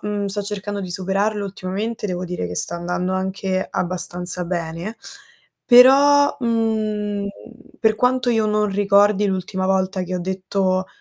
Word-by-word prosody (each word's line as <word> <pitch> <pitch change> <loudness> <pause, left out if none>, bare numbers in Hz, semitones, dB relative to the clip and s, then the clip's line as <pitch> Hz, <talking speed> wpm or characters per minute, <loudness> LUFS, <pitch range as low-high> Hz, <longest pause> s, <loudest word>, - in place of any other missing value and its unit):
ehm, 205 -1 -3
sto 200 +1 -3
cercando 205 0 -5
di 185 -2 -6
superarlo 195 +3 -1
ultimamente, 200 +3 -4
devo 180 -1 -3
dire 180 - -4
che 90 - -6
sta 170 - -2
andando 180 +2 -2
anche 190 0 -2
abbastanza 180 0 -1
bene, 170 +4 -4 0.7
però, 280 +4 +6
mhmm, 215 -4 -1 0.5
per 220 -1 +3
quanto 250 +1 +1
io 225 -2 +2
non 210 0 +1
ricordi 205 +1 +3
l'ultima 185 0 -2
volta 190 0 0
che 180 0 -4
ho 180 - -2
detto 185 0 -1
195 Hz, 140 wpm, -21 LUFS, 185-215 Hz, 0.7 s, però